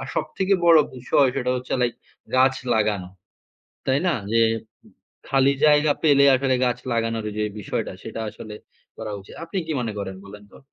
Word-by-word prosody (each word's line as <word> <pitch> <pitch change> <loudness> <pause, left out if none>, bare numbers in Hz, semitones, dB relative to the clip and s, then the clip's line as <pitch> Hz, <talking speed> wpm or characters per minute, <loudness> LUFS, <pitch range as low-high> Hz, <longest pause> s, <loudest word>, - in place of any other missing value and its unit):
আর 135 - -6
সবথেকে 190 +5 0
বড় 165 -1 +8 0.2
বিষয় 130 +2 +2
সেটা 125 0 0
হচ্ছে 125 0 -6
লাইক 120 -2 0 0.4
গাছ 130 +1 +5 0.2
লাগানো। 105 -4 0 0.8
তাই 135 +1 +2
না? 175 - +2 0.2
যে 115 0 +4 0.4
উম - - -19 0.4
খালি 135 0 +3
জায়গা 150 0 +5
পেলে 140 -2 +5
আসলে 130 0 +1
গাছ 125 -1 0
লাগানোর 115 -1 -1
যে 105 - +1 0.2
বিষয়টা 100 - -3
সেটা - - -6
আসলে 105 0 -10 0.4
করা 105 - -6
উচিত। 95 - -14
আপনি 170 +4 -4
কি 160 - -2
মনে 115 -3 -3
করেন 95 -1 -5
বলেন 105 +1 -11
তো? - - -14
125 Hz, 175 wpm, -23 LUFS, 110-140 Hz, 0.8 s, বড়